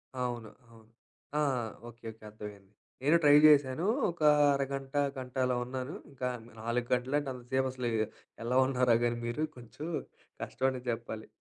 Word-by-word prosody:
అవును, 120 -3 -3 0.2
అవును. 110 -1 -18 0.5
ఆహ్, 130 -7 0 0.2
ఓకే. 115 0 -17
ఓకే. 110 0 -19
అర్థమైంది. 105 -2 -10 0.3
నేను 150 +5 +5
ట్రై 145 -1 +7
చేశాను, 145 +1 +4 0.3
ఒక 170 - -15 0.3
అరగంట, 135 0 -3 0.2
గంట 130 0 -7
అలా 125 0 +1
ఉన్నాను. 130 +3 -4 0.2
ఇంకా 130 -2 -3 0.3
4 120 +2 -1
గంటలు 125 +3 0
అంటే 145 -2 -4
అంత 125 -1 -10
సేపు 130 0 +3
అసలు, 125 -2 -2 0.5
ఎలా 125 +2 +1
ఉన్నారో 125 -3 +3
కానీ 120 0 +1
మీరు 120 +6 -1
కొంచెం, 125 +6 -8 0.6
కష్టం 130 - -1
అనే 130 -1 -5
చెప్పాలి. 115 -1 -5
125 Hz, 155 wpm, -31 LUFS, 120-135 Hz, 0.6 s, ట్రై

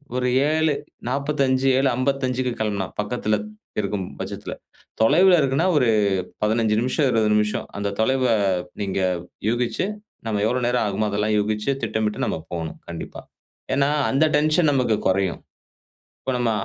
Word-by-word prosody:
ஒரு 125 0 0 0.2
7:45, 140 -3 0
இல்ல 135 0 +3
55 130 -1 0
கிளம்புனா 100 -3 -1
பக்கத்துல, 105 0 0 0.5
இருக்கும் 100 -2 -3
பச்சத்தில. - - -5 0.5
தொலைவில 175 +11 +6
இருக்குன்னா 140 +6 +1
ஒரு 125 -4 +3 0.5
15 110 0 +2
நிமிஷம், 130 +3 +1
20 110 -2 +2
நிமிஷம், 105 0 0
அந்த 100 0 -1
தொலைவ 130 +4 +2 0.6
நீங்க 95 -1 -1 0.5
யூகிச்சு, 120 +8 0 0.4
நம்ம 105 -2 0
எவ்ளோ 125 +2 0
நேரம் 125 -1 +1
ஆகுமோ 105 +2 -1
அதெல்லாம் 105 +1 0
யூகிச்சு 105 +3 -1
திட்டமிட்டு 110 -1 -1
நம்ப - - -1 0.2
போணும். 80 -2 -5
கண்டிப்பா. 85 -1 -7 0.5
ஏன்னா 140 +1 +2 0.2
அந்த 140 +4 +3
டென்ஷன் 155 +2 +3
நமக்கு 125 -5 +2
கொறையும். 95 -1 +1 0.8
இப்போ 130 - -2
நம்ம 120 -2 +1
120 Hz, 130 wpm, -23 LUFS, 105-135 Hz, 0.8 s, தொலைவில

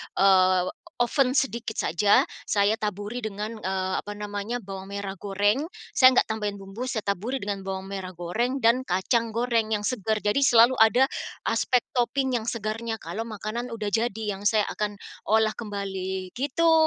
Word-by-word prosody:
eee, 185 -1 +4 0.3
oven 255 +1 +2
sedikit 235 -5 0
saja, 200 +5 +4 0.2
saya 205 +2 +2
taburi 210 +3 -4
dengan, 215 +2 -4
eee, 190 -2 -2
apa 205 - -5
namanya, 210 +3 -4
bawang 195 -1 -7
merah 200 -1 -4
goreng, 205 - +1 0.3
saya 255 0 +8
nggak - - +3
tambahin 205 -2 -3
bumbu, 195 +6 -6
saya 235 -4 -2
taburi 210 +7 -2
dengan 200 -1 -4
bawang 190 0 -4
merah 190 -2 -5
goreng 235 +10 -2
dan 245 +3 +3
kacang 225 +5 0
goreng 230 -2 +1
yang 210 - 0
segar, 215 -2 -1
jadi 205 +5 +1
selalu 240 +1 +6
ada 245 +5 +5 0.4
aspek 250 -2 +2 0.2
topping 260 +1 +1
yang 220 - -5
segarnya 225 0 -3
kalau 225 +2 -4
makanan 230 +2 -5
sudah 215 -2 -3
jadi 225 +1 0 0.2
yang 205 - -11
saya 215 0 +4
akan 210 -1 -2 0.3
olah 220 0 +2
kembali, 190 -3 -4
gitu. 325 +5 +2
215 Hz, 160 wpm, -26 LUFS, 200-235 Hz, 0.4 s, saya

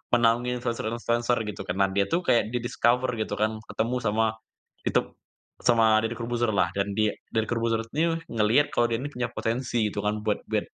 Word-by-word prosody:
menaungi 120 +1 +2
influencer-influencer 120 +1 0
gitu 105 -2 -6
kan. 90 - -2
Nah, 100 0 +3
dia 100 0 +1
itu 170 - 0
kayak 120 - +3
di 120 - -1
discover 125 +1 +2
gitu 110 - -2
kan, 110 +1 0
ketemu 115 +3 -1
sama 110 -1 +1 0.6
ditep - - +1 0.5
sama 115 -3 +4
Deddy 115 +2 -2
Corbuzier 120 0 -1
lah, 95 - +2
dan 100 0 -2
di 110 0 +2 0.2
Deddy 110 - +3
Corbuzier 115 -1 0
ini 165 +2 +1 0.2
ngelihat 115 +6 +3
kalau 120 - +2
dia 115 - -1
ini 145 +2 -5
punya 120 -3 -2
potensi 115 -1 -1
gitu - - -4
kan, 105 0 -1
buat 105 -1 0
buat - - 0
115 Hz, 190 wpm, -26 LUFS, 110-120 Hz, 0.6 s, sama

